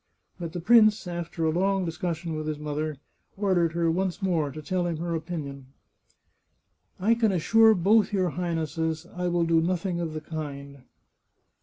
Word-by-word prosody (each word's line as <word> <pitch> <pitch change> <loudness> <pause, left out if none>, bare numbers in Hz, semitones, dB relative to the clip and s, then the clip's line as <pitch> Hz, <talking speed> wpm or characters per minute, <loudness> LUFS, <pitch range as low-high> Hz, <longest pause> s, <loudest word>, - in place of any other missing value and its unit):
But 170 -2 -5
the 175 - -3
prince, 215 +2 +5
after 170 -1 -4
a 160 - +2
long 190 +2 +1
discussion 170 -1 -3
with 155 0 -4
his 155 -1 -2
mother, 150 0 -3 0.4
ordered 180 -5 +1
her 170 -1 +1
once 185 +2 -1
more 170 -7 0
to 140 - -8
tell 175 +4 -1
him 170 -2 -2
her 170 +1 -3
opinion. 150 -5 -5 0.7
" - - -45
I - - +7
can 225 -2 +2
assure 220 +5 +5
both 205 +3 +3
your 185 -3 +1
Highnesses 160 -1 -2
I 180 0 -1
will 175 -1 +1
do 165 -1 +3
nothing 175 +1 -1
of 165 -2 -3
the 155 - -5
kind." 140 -4 -7
170 Hz, 170 wpm, -26 LUFS, 155-185 Hz, 0.7 s, I